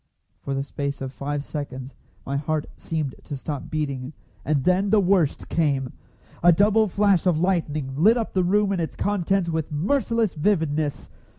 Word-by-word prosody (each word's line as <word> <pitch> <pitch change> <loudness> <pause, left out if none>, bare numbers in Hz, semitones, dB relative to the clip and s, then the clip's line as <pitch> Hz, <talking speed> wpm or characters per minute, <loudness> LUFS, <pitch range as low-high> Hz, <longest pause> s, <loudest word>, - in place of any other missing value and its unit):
For 140 - -4
the 135 - -1
space 140 0 -4
of 135 -1 -5
five 145 +1 -3
seconds 140 -3 -6 0.3
my 140 - -3
heart 150 +1 -1
seemed 155 -5 -3
to 145 - -6
stop 145 0 -5
beating, 140 -3 -3 0.3
and 145 -3 0
then 185 +4 +2
the 215 +1 +5
worst 180 -6 +2
came. 140 -6 0 0.5
A 175 - +7
double 210 +5 +4
flash 200 -2 +2
of 165 -4 +3
lightning 155 -7 0
lit 210 - +5
up 230 - -3
the 185 - +2
room 200 +3 +2
and 185 -3 0
its 160 - -4
contents 195 -3 0
with 160 -1 -2
merciless 225 - +1
vividness. 155 -4 0
160 Hz, 170 wpm, -24 LUFS, 145-195 Hz, 0.5 s, A